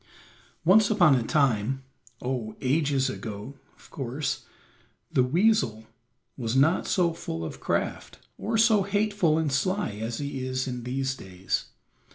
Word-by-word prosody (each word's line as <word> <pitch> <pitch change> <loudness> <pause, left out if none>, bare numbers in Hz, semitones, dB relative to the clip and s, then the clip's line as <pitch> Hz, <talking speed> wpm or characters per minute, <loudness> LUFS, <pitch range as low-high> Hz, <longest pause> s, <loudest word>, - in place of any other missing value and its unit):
Once 205 +4 +6
upon 180 -9 +5
a 125 - +3
time, 135 -1 +1 0.4
oh, 125 -4 -3
ages 140 -1 +1
ago, 110 -1 -6 0.2
of - - -19
course, 135 +1 -3 0.7
the - - +3
weasel 130 - +2 0.5
was 120 -2 -2
not 155 +7 +3
so 175 -3 +2
full 80 - -5
of - - -7
craft, - - -2 0.2
or 225 +1 -1
so 220 -2 +5
hateful 200 -5 +1
and 160 -3 0
sly 185 - 0
as 115 +1 -3
he 140 -2 -4
is 130 +1 -2
in 125 -2 -5
these 130 +1 -1
days. 95 -6 -3
135 Hz, 140 wpm, -27 LUFS, 125-175 Hz, 0.7 s, Once